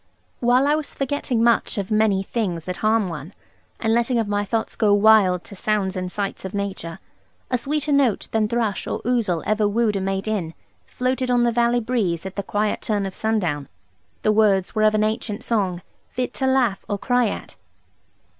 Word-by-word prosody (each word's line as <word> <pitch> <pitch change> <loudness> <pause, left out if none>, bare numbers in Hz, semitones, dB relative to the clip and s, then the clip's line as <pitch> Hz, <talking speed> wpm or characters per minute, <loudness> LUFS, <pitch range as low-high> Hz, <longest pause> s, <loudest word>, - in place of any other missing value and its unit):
While 250 +2 +3
I 290 - +3
was 305 -1 -3
forgetting 270 -4 -1
much 235 -2 +2
of 200 +1 -3
many 215 -3 +2
things 185 -7 -3
that 180 0 -4
harm 215 -1 +2
one, 165 +1 -7 0.4
and 225 0 +1
letting 235 +1 +1
of 225 -2 0
my 205 0 0
thoughts 220 +2 -2
go 205 -2 +3
wild 205 -4 +5
to 200 - -11
sounds 200 -1 -1
and 185 -1 -3
sights 200 0 -4
of 190 +2 -6
nature, 190 -4 -4 0.5
a 250 - +3
sweeter 295 +3 -1
note 275 -7 +2
than 220 -1 +1
thrush 225 -3 -1
or - - -3
ouzel 225 -9 0
ever 215 0 +2
wooed 215 0 +1
a 195 - -1
mate 195 +1 -2
in, 185 -7 -2 0.3
floated 255 0 -1
on 245 -1 +3
the 240 - +3
valley 240 +1 +2
breeze 200 -8 -1
at 190 - -6
the 200 - -1
quiet 205 +2 -1
turn 205 -2 -1
of 190 - -5
sundown. 175 -12 -1 0.6
The 215 - +4
words 205 -3 +3
were 215 - 0
of 215 0 +4
an 215 - +2
ancient 215 0 -2
song, 190 -6 -1 0.3
fit 250 0 -3
to 265 - -1
laugh 250 -6 +2
or 205 - 0
cry 245 +3 +2
at. - - -6
215 Hz, 195 wpm, -22 LUFS, 195-235 Hz, 0.6 s, wild